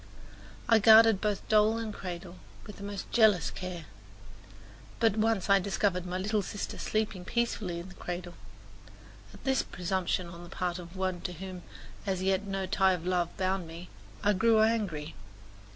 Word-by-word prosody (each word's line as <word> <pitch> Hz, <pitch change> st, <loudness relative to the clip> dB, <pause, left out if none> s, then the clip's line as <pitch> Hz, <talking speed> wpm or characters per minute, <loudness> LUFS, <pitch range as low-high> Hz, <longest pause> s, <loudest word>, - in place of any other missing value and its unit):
I 225 Hz, -1 st, +6 dB
guarded 220 Hz, -1 st, +7 dB
both 210 Hz, -2 st, -1 dB
doll 215 Hz, +1 st, +4 dB
and 225 Hz, -2 st, -4 dB
cradle 180 Hz, -1 st, -7 dB, 0.3 s
with 210 Hz, -, -10 dB
the 200 Hz, -, -9 dB
most 200 Hz, 0 st, -6 dB
jealous 210 Hz, -, +4 dB
care; 180 Hz, -3 st, -6 dB, 1.1 s
but 225 Hz, -3 st, +3 dB
once 220 Hz, -3 st, +1 dB
I 200 Hz, -1 st, +6 dB
discovered 190 Hz, -1 st, 0 dB
my 180 Hz, +1 st, -2 dB
little 210 Hz, +3 st, 0 dB
sister 200 Hz, +1 st, -5 dB
sleeping 215 Hz, -4 st, -2 dB
peacefully 220 Hz, -6 st, -1 dB
in 170 Hz, +2 st, -7 dB
the -, -, -12 dB
cradle. 175 Hz, 0 st, -6 dB, 1.0 s
At -, -, -15 dB
this 265 Hz, -1 st, +2 dB
presumption 185 Hz, 0 st, -2 dB
on 170 Hz, 0 st, -10 dB
the 175 Hz, -, -11 dB
part 180 Hz, 0 st, -3 dB
of 170 Hz, +1 st, -10 dB
one 185 Hz, -2 st, -2 dB
to 180 Hz, -, -4 dB
whom 185 Hz, +1 st, -7 dB, 0.5 s
as 190 Hz, -1 st, -1 dB
yet 195 Hz, +1 st, +1 dB
no 195 Hz, -1 st, -2 dB
tie 190 Hz, -1 st, +3 dB
of 175 Hz, -2 st, -4 dB
love 180 Hz, -2 st, 0 dB
bound 185 Hz, -2 st, -1 dB
me 170 Hz, +2 st, -9 dB, 0.3 s
I 205 Hz, 0 st, +4 dB
grew 225 Hz, +3 st, +4 dB
angry. 200 Hz, -9 st, 0 dB
190 Hz, 170 wpm, -30 LUFS, 180-210 Hz, 1.1 s, guarded